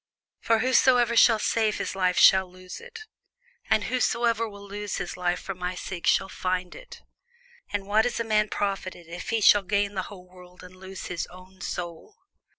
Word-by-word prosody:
For 225 Hz, -, +2 dB
whosoever 250 Hz, 0 st, +4 dB, 0.2 s
will 225 Hz, -, +2 dB
save 215 Hz, 0 st, 0 dB
his -, -, -4 dB
life 185 Hz, -1 st, +1 dB
shall 190 Hz, -1 st, +6 dB
lose 185 Hz, 0 st, -10 dB
it: 470 Hz, -1 st, -11 dB, 0.7 s
and 215 Hz, -1 st, +3 dB
whosoever 235 Hz, -2 st, 0 dB
will 200 Hz, -1 st, -12 dB
lose 205 Hz, 0 st, -5 dB
his 180 Hz, -, -4 dB
life 180 Hz, -1 st, -1 dB
for 195 Hz, -, -5 dB
my 180 Hz, 0 st, -4 dB
sake 180 Hz, -1 st, -6 dB
shall 195 Hz, -, +3 dB
find 185 Hz, -1 st, -3 dB
it. -, -, -13 dB, 0.7 s
For 205 Hz, -, -2 dB
what 215 Hz, +4 st, +3 dB
is 245 Hz, -, -3 dB
a -, -, 0 dB
man 215 Hz, -1 st, +1 dB
profited, 195 Hz, -3 st, -3 dB
if 170 Hz, +2 st, -8 dB
he 225 Hz, -1 st, 0 dB
shall 205 Hz, 0 st, +7 dB
gain 200 Hz, +1 st, 0 dB
the 190 Hz, -, -2 dB
whole 185 Hz, -3 st, -12 dB
world, 180 Hz, 0 st, -16 dB
and 180 Hz, 0 st, -13 dB
lose 190 Hz, 0 st, -9 dB
his 175 Hz, -2 st, -4 dB
own 185 Hz, +1 st, -15 dB
soul? 175 Hz, -, -6 dB
195 Hz, 185 wpm, -26 LUFS, 180-220 Hz, 0.7 s, shall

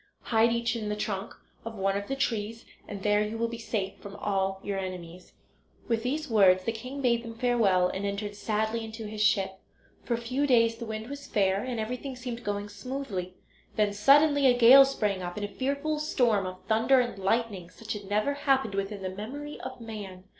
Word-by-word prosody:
Hide 230 Hz, 0 st, +3 dB
each 235 Hz, 0 st, 0 dB
in 215 Hz, -2 st, -3 dB
the 210 Hz, -, -1 dB
trunk 205 Hz, -1 st, -4 dB, 0.3 s
of 230 Hz, 0 st, -6 dB
one 195 Hz, -1 st, 0 dB
of 200 Hz, 0 st, -3 dB
the 270 Hz, -, -2 dB
trees 225 Hz, -3 st, -2 dB, 0.2 s
and 200 Hz, -1 st, -7 dB
there 210 Hz, 0 st, +3 dB
you 210 Hz, +2 st, -2 dB
will 230 Hz, 0 st, 0 dB
be 230 Hz, 0 st, -6 dB
safe 215 Hz, -4 st, -3 dB
from 200 Hz, 0 st, -9 dB
all 195 Hz, -2 st, -1 dB
your 200 Hz, -1 st, -2 dB
enemies." 180 Hz, -1 st, -7 dB, 0.5 s
With 230 Hz, -1 st, +1 dB
these 295 Hz, +6 st, -2 dB
words 190 Hz, -5 st, +5 dB
the 230 Hz, -, 0 dB
king 255 Hz, +5 st, -7 dB
bade 235 Hz, -2 st, +2 dB
them 230 Hz, -1 st, -8 dB
farewell 225 Hz, -7 st, +3 dB
and 190 Hz, +2 st, -4 dB
entered 200 Hz, +1 st, -3 dB
sadly 220 Hz, +2 st, -1 dB
into 225 Hz, 0 st, -7 dB
his 210 Hz, 0 st, -5 dB
ship. 195 Hz, -2 st, +2 dB, 0.4 s
For 240 Hz, -, 0 dB
a -, -, -3 dB
few 255 Hz, +5 st, -1 dB
days 230 Hz, -3 st, +4 dB
the 235 Hz, -1 st, -6 dB
wind 220 Hz, 0 st, -5 dB
was 285 Hz, +1 st, -8 dB
fair, 195 Hz, -1 st, +1 dB
and 250 Hz, -3 st, -3 dB
everything 250 Hz, +4 st, -4 dB
seemed 245 Hz, -1 st, -6 dB
going 205 Hz, -1 st, -2 dB
smoothly; 205 Hz, -6 st, -5 dB, 0.4 s
then, 210 Hz, -1 st, +2 dB
suddenly, 285 Hz, +6 st, +5 dB
a 245 Hz, -1 st, +4 dB
gale 255 Hz, +3 st, +9 dB
sprang 210 Hz, -8 st, -1 dB
up, 175 Hz, 0 st, -5 dB
and 205 Hz, -, -2 dB
a -, -, -3 dB
fearful 280 Hz, +7 st, -2 dB
storm 235 Hz, -10 st, +1 dB
of 185 Hz, 0 st, -8 dB
thunder 230 Hz, +4 st, +4 dB
and 240 Hz, -5 st, -1 dB
lightning, 195 Hz, -3 st, -1 dB
such 225 Hz, +3 st, -6 dB
as 205 Hz, -, -6 dB
had 195 Hz, -, -13 dB
never 210 Hz, +7 st, +1 dB
happened 270 Hz, -6 st, +1 dB
within 195 Hz, 0 st, -3 dB
the 185 Hz, -, -2 dB
memory 265 Hz, +10 st, -7 dB
of 260 Hz, 0 st, -7 dB
man. 205 Hz, -5 st, -8 dB
220 Hz, 210 wpm, -28 LUFS, 200-245 Hz, 0.5 s, gale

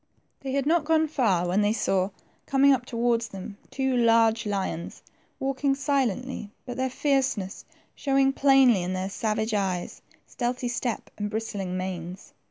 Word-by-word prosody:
They 265 Hz, -1 st, -5 dB
had 275 Hz, -1 st, 0 dB
not 325 Hz, +1 st, +3 dB
gone 315 Hz, 0 st, +2 dB
far 210 Hz, -, +1 dB
when 185 Hz, +4 st, +2 dB
they 205 Hz, +1 st, +2 dB
saw, 190 Hz, -4 st, +1 dB, 0.4 s
coming 275 Hz, 0 st, +5 dB
up 250 Hz, -1 st, -2 dB
towards 235 Hz, -1 st, 0 dB
them, 200 Hz, 0 st, -9 dB
two 265 Hz, -1 st, 0 dB
large 230 Hz, -2 st, +3 dB
lions, 190 Hz, -4 st, -3 dB, 0.4 s
walking 270 Hz, +1 st, 0 dB
silently, 260 Hz, -5 st, -1 dB, 0.2 s
but 245 Hz, -2 st, -5 dB
their 260 Hz, +1 st, -1 dB
fierceness 265 Hz, -8 st, -1 dB, 0.3 s
showing 270 Hz, -1 st, +2 dB
plainly 270 Hz, -7 st, +5 dB
in 180 Hz, +1 st, -2 dB
their 185 Hz, +1 st, -2 dB
savage 220 Hz, +1 st, -1 dB
eyes, 190 Hz, -4 st, -2 dB, 0.2 s
stealthy 245 Hz, 0 st, -2 dB
step, 240 Hz, -1 st, -3 dB
and 205 Hz, 0 st, -2 dB
bristling 205 Hz, -4 st, -3 dB
manes. 185 Hz, 0 st, -6 dB
235 Hz, 150 wpm, -26 LUFS, 195-270 Hz, 0.4 s, coming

